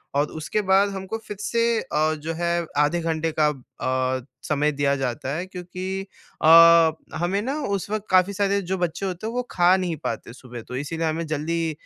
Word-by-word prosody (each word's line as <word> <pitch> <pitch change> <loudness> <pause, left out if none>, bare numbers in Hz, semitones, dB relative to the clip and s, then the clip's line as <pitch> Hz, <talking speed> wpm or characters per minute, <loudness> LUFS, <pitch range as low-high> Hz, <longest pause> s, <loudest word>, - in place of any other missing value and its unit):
और 145 +1 +2
उसके 210 +7 -1
बाद 195 +1 +5
हमको 190 +2 -5
फ़िर 210 -3 -9
से 230 +2 +1
अ, 155 +1 0
जो 160 +2 -5
है 170 0 -1
आधे 150 +4 +2
घंटे 160 0 -1
का 150 - +5 0.7
अ, 130 - -7 0.2
समय 150 0 +1
दिया 140 -1 +1
जाता 135 +1 -3
है 175 +3 -3
क्योंकि 185 +1 -5 0.4
अ, 165 0 +8 0.3
हमें 180 +4 0
ना 260 +6 -2 0.2
उस 195 0 -5
वक़्त 215 0 -3
काफ़ी 185 +2 +4
सारे 200 0 +1
जो 190 +1 -3
बच्चे 175 +2 -2
होते 185 +3 -4
वो 245 +2 -2
खा 180 +1 +4
नहीं 180 -3 -2
पाते 115 +1 -4
सुबह 125 -2 -10
तो 125 - -6
इसीलिए 160 +5 -2
हमें 160 +1 -2
जल्दी 160 +2 -1
170 Hz, 185 wpm, -24 LUFS, 155-190 Hz, 0.7 s, अ